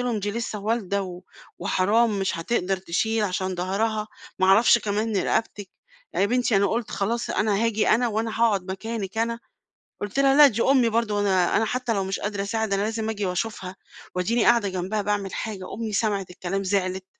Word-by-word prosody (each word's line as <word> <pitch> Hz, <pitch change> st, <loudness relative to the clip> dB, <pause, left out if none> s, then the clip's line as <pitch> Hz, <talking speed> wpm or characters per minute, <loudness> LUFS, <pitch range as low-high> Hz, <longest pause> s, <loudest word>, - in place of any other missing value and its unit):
لهم 240 Hz, -4 st, -1 dB
"دي 205 Hz, +1 st, -2 dB
لسة 225 Hz, -1 st, -4 dB
والدة 200 Hz, -2 st, -1 dB
و 180 Hz, -1 st, -8 dB, 0.4 s
وحرام 210 Hz, +3 st, +2 dB
مش 190 Hz, -3 st, -1 dB
هتقدر 190 Hz, +1 st, 0 dB
تشيل 210 Hz, +5 st, -1 dB
عشان 185 Hz, -1 st, -2 dB
ضهرها،" 210 Hz, +4 st, -1 dB, 0.3 s
ما 190 Hz, -, +3 dB
أعرفش 220 Hz, +5 st, +6 dB
كمان 210 Hz, 0 st, -1 dB
رقبتِك 205 Hz, 0 st, -1 dB, 0.4 s
يا 200 Hz, -, +2 dB
بنتي 245 Hz, -2 st, +1 dB
أنا 200 Hz, +1 st, +3 dB
قُلت 230 Hz, +2 st, -2 dB
خلاص 230 Hz, +4 st, -2 dB
أنا 210 Hz, +1 st, +1 dB
هاجي 220 Hz, -2 st, +1 dB
أنا 240 Hz, +2 st, +3 dB
وأنا 220 Hz, +1 st, -2 dB
هاقعد 200 Hz, -5 st, +2 dB
مكانِك 220 Hz, 0 st, -5 dB
أنا." 230 Hz, +1 st, 0 dB, 0.6 s
قُلت 205 Hz, +5 st, -4 dB
لها: 275 Hz, 0 st, +4 dB
"لا 295 Hz, -, +10 dB
دي 230 Hz, -4 st, +1 dB
أمي 260 Hz, -4 st, +4 dB
برضه 225 Hz, -1 st, 0 dB
وأنا 190 Hz, -3 st, +2 dB
أنا 225 Hz, -, +3 dB
حتى 245 Hz, +1 st, -1 dB
لو 195 Hz, -2 st, 0 dB
مش 195 Hz, +1 st, -3 dB
قادرة 205 Hz, -1 st, -2 dB
أساعد 220 Hz, 0 st, -2 dB
أنا 195 Hz, -, +1 dB
لازم 220 Hz, +1 st, -2 dB
آجي 205 Hz, -3 st, -2 dB
وأشوفها 185 Hz, 0 st, -3 dB, 0.4 s
وأديني 220 Hz, +6 st, +1 dB
قاعدة 235 Hz, -4 st, +4 dB
جنبها 190 Hz, +3 st, -2 dB
باعمل 205 Hz, -1 st, -2 dB
حاجة." 205 Hz, -4 st, -5 dB
أمي 220 Hz, 0 st, -4 dB
سمعِت 200 Hz, -3 st, -1 dB
الكلام 185 Hz, +2 st, -3 dB
زعلِت. 185 Hz, -1 st, -1 dB
210 Hz, 185 wpm, -24 LUFS, 195-225 Hz, 0.6 s, لا